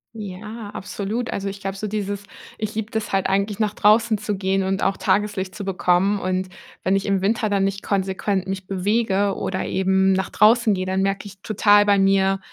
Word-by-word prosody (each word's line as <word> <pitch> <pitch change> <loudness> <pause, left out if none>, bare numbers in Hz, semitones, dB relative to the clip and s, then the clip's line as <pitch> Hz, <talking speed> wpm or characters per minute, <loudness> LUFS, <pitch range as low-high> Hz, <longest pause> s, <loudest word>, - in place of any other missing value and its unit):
Ja, 210 +2 -7
absolut. 210 +5 -4
Also, 200 0 -3
ich 200 0 -8
glaube 195 -1 -4
so 215 - -4
dieses 205 -1 -3 0.3
ich 215 0 -4
liebe 220 0 -3
das 220 -1 -3
halt 195 -1 +2
eigentlich 200 +2 0
nach 210 -1 0
draußen 215 +1 +3
zu 210 0 -3
gehen 190 0 0
und 195 +1 -1
auch 195 - +1
Tageslicht 195 -2 0
zu 205 - -6
bekommen. 195 +1 +2
Und, 185 0 -2 0.3
wenn 190 +1 +2
ich 195 - -1
im 195 -2 +1
Winter 215 +2 +1
dann 200 -1 +1
nicht 195 0 -3
konsequent 195 0 -1
mich 190 -1 -4
bewege 200 0 0
oder 190 0 -3
eben 190 0 +2
nach 190 0 -1
draußen 220 0 +4
gehe, 185 -1 -2
dann 190 +1 0
merke 195 +1 -1
ich 195 -1 -14
total 205 -1 +4
bei 200 -1 +4
mir, 195 0 +3
195 Hz, 200 wpm, -22 LUFS, 190-210 Hz, 0.3 s, draußen